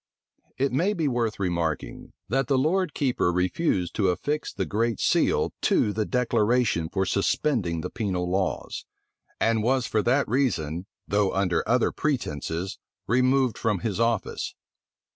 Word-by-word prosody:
It 135 +1 +1
may 175 +11 +1
be 165 -6 0
worth 120 -5 -1
remarking, 85 -4 -2
that 130 +4 0
the 135 - +2
lord 165 +5 +1
keeper 125 -10 +1
refused 90 - 0
to 100 -3 +3
affix 145 +12 -2
the - - -2
great 115 +1 -1
seal - - +2
to 105 - +2
the 110 0 -1
declaration 115 -7 +1
for 95 +1 0
suspending 100 - 0
the 90 - -5
penal 95 -5 -2
laws; 95 +1 -2 0.5
and 115 -1 +2
was 125 +2 +1
for 110 - +1
that 135 +6 +2
reason, 95 - 0 0.2
though 100 -2 +1
under 90 -4 +1
other 125 0 +3
pretences 95 - -2 0.3
removed 130 +1 +2
from 105 -5 0
his 110 -3 -2
office. 115 0 -1
110 Hz, 145 wpm, -26 LUFS, 95-130 Hz, 0.5 s, to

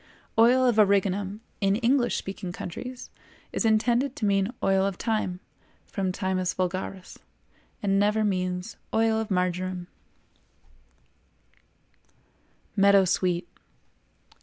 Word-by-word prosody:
"Oil 250 +3 +6
of 240 -3 +2
Origanum" 200 0 +2 0.2
in 195 -1 +2
English 240 +2 +2
speaking 190 -2 -5
countries 250 +9 -7 0.4
is - - -1
intended 240 +4 +2
to 215 - -2
mean 195 +1 +2
Oil 195 0 +3
of 195 -1 -1
Thyme 215 -4 -2 0.5
(from 190 -3 -2
Thymus 185 -1 -1
vulgaris), 185 0 -4 0.6
and 195 -1 +2
never 210 +2 +2
means 185 0 -2 0.2
Oil 225 0 +3
of 220 - -3
Marjoram. 180 -1 -1 2.9
MEADOW 200 -1 +5
SWEET. 175 -1 0
195 Hz, 105 wpm, -26 LUFS, 185-220 Hz, 2.9 s, Oil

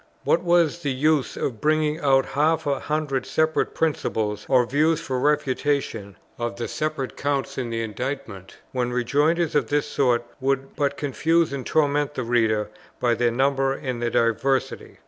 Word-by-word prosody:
What 165 - +2
was 170 -2 +2
the 145 -5 -2
use 145 +1 +1
of 115 -6 -3
bringing 155 0 +1
out 135 -2 +3
half 160 +3 +1
a 140 -2 0
hundred 150 -4 -2
separate 155 0 0
principles 110 -9 -1
or 130 -2 +4
views 155 +6 +2
for 130 - -3
the - - -1
refutation 140 -8 0 0.2
of 120 0 -2
the 120 0 -4
separate 155 -4 -3
counts 140 -1 -2
in 125 -2 -3
the 115 0 -2
Indictment, 115 -3 -6
when 125 -1 -1
rejoinders 145 +7 +1
of 145 -6 +1
this 145 +3 +1
sort 120 -3 +1
would 135 0 -1
but 145 -1 0
confuse 160 +3 +1
and 135 -2 -4
torment 145 -1 +1
the 130 - -2
reader 110 -3 +1 0.3
by 120 -1 +2
their 120 +1 +2
number 135 +2 +1
and 130 -4 -4
their 120 - 0
diversity? 120 +4 0
135 Hz, 165 wpm, -24 LUFS, 120-150 Hz, 0.3 s, or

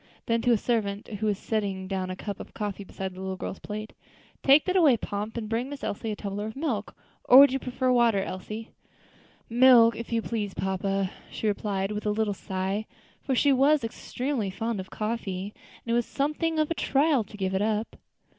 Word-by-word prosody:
Then 230 0 +1
to 245 - +3
a 230 - +5
servant 210 -2 -1
who 215 - 0
was 205 -2 +1
setting 200 -3 -2
down 190 -1 -2
a 185 - -3
cup 200 +1 -6
of - - -10
coffee 205 -2 -4
beside 190 -1 -6
the 185 - -9
little 190 0 -3
girl's 185 - -5
plate, 215 +1 -6 0.5
"Take 280 +2 +6
that 370 - 0
away, 305 -10 +6
Pomp, 210 +2 -4
and 220 -2 -3
bring 230 +4 -1
Miss 285 -1 -8
Elsie 220 +2 -3
a 210 - -2
tumbler 205 +1 -4
of 220 - -7
milk. 265 -8 -3 0.3
Or 250 - +8
would 280 -1 +9
you 270 - 0
prefer 255 0 -1
water, 235 -4 +4
Elsie?" 215 +4 -6 0.8
"Milk, 235 -1 +6
if 230 +1 -7
you 230 -1 0
please, 210 -4 -3
papa," 190 0 -1 0.2
she - - -6
replied 200 -1 -1
with 210 0 -3
a - - +3
little 210 0 0
sigh; 190 +2 -3 0.3
for 265 - -1
she 280 +3 +4
was 280 +2 +4
extremely 245 0 -3
fond 225 +2 -3
of 190 - -7
coffee, 210 -3 -3 0.3
and 230 - -2
it - - +2
was 240 0 +1
something 305 +3 -1
of 310 +1 +1
a - - +4
trial 285 -4 +2
to 210 +1 -13
give 190 -1 -1
it 190 - +1
up. 215 +1 -1
220 Hz, 210 wpm, -27 LUFS, 200-245 Hz, 0.8 s, would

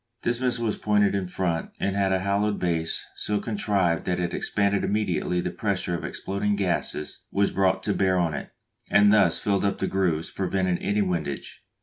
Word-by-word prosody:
This 120 0 0
missile 125 -2 0
was 110 - -1
pointed 105 -1 +3
in 95 -2 -1
front, 90 -2 -2
and 100 0 0
had 100 -1 +2
a 95 0 +1
hollowed 100 +1 +1
base 80 -2 -1
so 105 -1 -1
contrived 100 -6 0
that 90 -1 0
it 90 -1 -1
expanded 100 -1 0
immediately 95 -4 0
the 90 - -3
pressure 100 -5 -1
of 85 - -3
exploding 100 +1 -2
gases 90 -6 -2
was 100 0 +2
brought 95 -1 +1
to 105 - 0
bear 95 -1 +2
on 85 -3 +1
it, 70 - -5 0.4
and 100 0 +6
thus 90 -6 +4
filled 100 -1 0
up 100 - +1
the - - -1
grooves, 85 -4 0
preventing 95 -2 0
any 100 +1 +1
windage. 85 -7 -4
95 Hz, 190 wpm, -25 LUFS, 90-105 Hz, 0.4 s, and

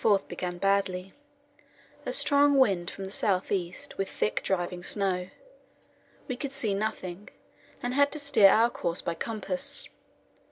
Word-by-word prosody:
February 215 -2 +5
24 - - -15
began 180 -1 -4
badly 195 -1 0 0.9
a - - 0
strong 285 +2 +4
wind 195 -9 +3
from 195 - -8
the 190 - -7
south 195 -2 0
east, 180 -1 -3
with 195 - -1
thick - - -1
driving 175 -1 -1
snow. 185 -2 0 1.0
We 255 - -2
could 275 +1 -5
see 230 -7 0
nothing, 200 -2 -4 0.5
and 245 +1 -1
had 285 +1 +4
to 305 - -1
steer 280 -9 +6
our 230 +4 +4
course 170 -6 -2
by 170 - -1
compass. 270 +9 -3
200 Hz, 155 wpm, -28 LUFS, 185-250 Hz, 1.0 s, steer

